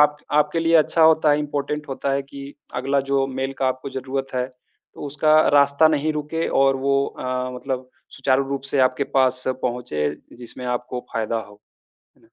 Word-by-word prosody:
आप 150 0 +5 0.2
आपके 150 +2 +2
लिए 165 0 +2
अच्छा 160 +1 +3
होता 160 -1 +5
है, 145 - +3
इम्पोर्टेंट 150 0 -3
होता 135 +1 -2
है 140 - 0
कि 140 +1 -10 0.2
अगला 135 +2 +1
जो 135 -1 +2
मेल 135 0 -3
का 135 - +1
आपको 130 +1 -4
ज़रूरत 135 0 -4
है 125 0 0 0.5
तो - - -12
उसका 155 +2 +3 0.2
रास्ता 140 +2 +5
नहीं 155 0 +1
रुके 150 +2 -2 0.2
और 135 0 +3
वो 140 +1 +1
अ, 130 0 -3
मतलब 130 0 -4 0.3
सुचारू 135 0 +2
रूप 140 -1 -3
से 140 - +1
आपके 130 +2 -3
पास 130 -1 +3 0.2
पहुँचे, 120 -12 -1 0.3
जिसमें 125 +1 -8
आपको 125 0 -3
फ़ायदा 115 0 -1
हो, 105 -1 -14 0.6
है - - -28
ना? - - -30
135 Hz, 185 wpm, -22 LUFS, 130-145 Hz, 0.6 s, आप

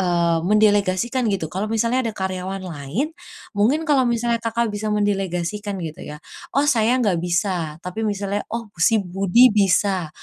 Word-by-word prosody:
eee, 170 -2 +2
mendelegasikan 210 +5 +2
gitu. 195 -5 -1
Kalau 195 +4 -2
misalnya 230 +3 +1
ada - - -4
karyawan 190 0 -4
lain, 180 - -4 0.4
mungkin 245 +11 +1
kalau 270 -5 +3
misalnya, 235 0 0
Kakak 230 -1 -1
bisa 210 +1 -3
mendelegasikan 205 -1 -1
gitu 155 -1 -7
ya. 150 - -8 0.4
"Oh 280 - +4
saya 245 -3 +3
nggak 200 -9 +1
bisa." 175 -3 -1
Tapi 180 +4 -5
misalnya, 205 -1 -1
"Oh, 230 -3 -6
si 220 +7 +4
Budi 195 +5 +4
bisa, 195 -3 +2
205 Hz, 155 wpm, -21 LUFS, 180-230 Hz, 0.4 s, Oh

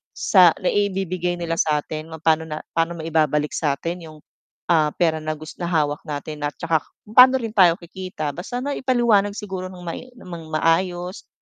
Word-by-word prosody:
sa 180 -5 +5
naibibigay 185 -3 -1
nila 165 -1 -3
satin 155 0 -1 0.2
paano 160 0 +2 0.2
paano 165 +1 0
maibabalik 155 -2 0
sa 145 -3 0
atin 170 +2 -5
'yong 155 -1 -12 0.5
ah, 155 -3 +4
pera 160 -2 +1
na 155 0 -3
gus 155 +1 -11
na 175 - -2
hawak 150 -4 0
natin 150 0 -4
at 145 - -7
saka 165 -1 +1 0.2
kung 210 - -16
paano 255 +1 +9
rin 230 -4 -2
tayo 185 -6 +5
kikita 170 -3 -6
basta 220 - -5
na 285 - -2
ipaliwanag 235 -6 +2
siguro 190 -3 -5
ng 180 -1 -11
mai 170 +8 -6
ng 175 -7 -9
maayos, 175 +3 0
170 Hz, 170 wpm, -22 LUFS, 155-190 Hz, 0.5 s, paano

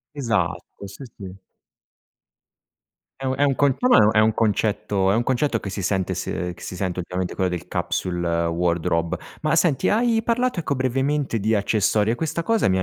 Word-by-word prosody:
Esatto, 115 -5 -2
sì, 100 +7 -10
sì. 95 -1 -10 1.8
È - - -2
un 130 - 0
è - - -1
un 140 -1 +3
conce 140 0 +2
ma 255 - +6
è - - +7
un 105 0 +5
è 110 - +2
un 110 0 +4
concetto 105 -3 +1
è - - +2
un 115 - +2
concetto 130 -2 0
che 100 - -6
si 100 0 -4
sente 95 0 -1
se 90 0 -3
che 85 - -15
si - - -6
sente 90 -1 -2
ultimamente, 90 +1 -4
quello 95 -1 0
del 90 -2 -5
capsule 85 -2 -1
wardrobe. 85 -1 0 0.2
Ma, 155 +1 +1
senti, 160 -6 +2
hai 225 +1 +2
parlato, 240 -2 0
ecco, 140 -3 -1
brevemente 135 0 0
di 110 +2 +1
accessori, 105 +1 +1
e - - +2
questa 160 +4 -2
cosa 225 +4 +1
mi 95 - +2
ha 95 - 0
110 Hz, 195 wpm, -23 LUFS, 95-140 Hz, 1.8 s, è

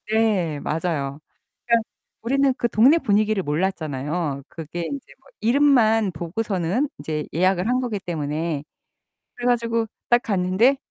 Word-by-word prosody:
네. 205 -9 +1
맞아요. 150 -3 -2 0.5
그니까 235 -1 +4 0.4
우리는 275 +3 +2
그 240 - +1
동네 235 +8 +5
분위기를 215 - +1
몰랐잖아요. 150 -3 -2
그게 165 +1 -7
인제 275 +10 -5
뭐 265 - -24
이름만 225 -4 +4
보고서는 190 - -1
이제 150 0 -3
예약을 185 +3 +2
한 250 +1 +2
거기 230 -5 -2
때문에. 155 -3 -3 0.7
그래 245 - -5
가지고 230 -2 +1 0.2
딱 240 0 +4
갔는데 195 +6 +2
195 Hz, 295 characters per minute, -23 LUFS, 165-235 Hz, 0.7 s, 동네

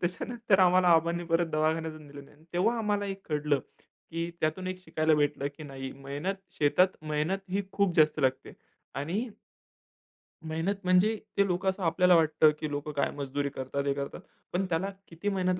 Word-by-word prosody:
त्याच्यानंतर 200 +4 0
आम्हाला 180 -1 +5
अबांनी 170 +1 +1
परत 170 0 +3
दवाखान्यातून 155 0 -1
दिलं 140 0 -10
नाही. 150 +3 -21
तेव्हा 215 +7 +2
आम्हाला 205 -2 0
एक 195 0 -5
कळलं, 150 -2 +1 0.5
की 165 +1 -3
त्यातून 160 +4 -1
एक 185 0 -4
शिकायला 155 -1 +2
भेटलं 145 -1 +1
की 155 - -9
नाही 135 -2 -7
मेहनत 145 +8 -4 0.2
शेतात 180 +6 +3
मेहनत 155 +6 0
ही 200 +2 0
खूप 200 -4 +1
जास्त 155 0 +4
लागते 130 -1 0 0.5
आणि 175 +9 -1 1.2
मेहनत 165 +5 -1
म्हणजे 185 +5 +4 0.2
ते 200 - +5
लोकं 185 +1 0
असं 190 0 -3
आपल्याला 180 +2 +4
वाटतं, 155 -1 +5
की 155 - -3
लोकं 145 +1 -3
काय 140 - 0
मजदुरी 140 0 -2
करतात, 140 +1 -4
हे 140 - +3
करतात. 140 0 -5 0.3
पण 190 +2 +1
त्याला 180 +4 0 0.2
किती 170 +5 -3
मेहनत 185 -2 0
165 Hz, 170 wpm, -29 LUFS, 150-185 Hz, 1.2 s, आम्हाला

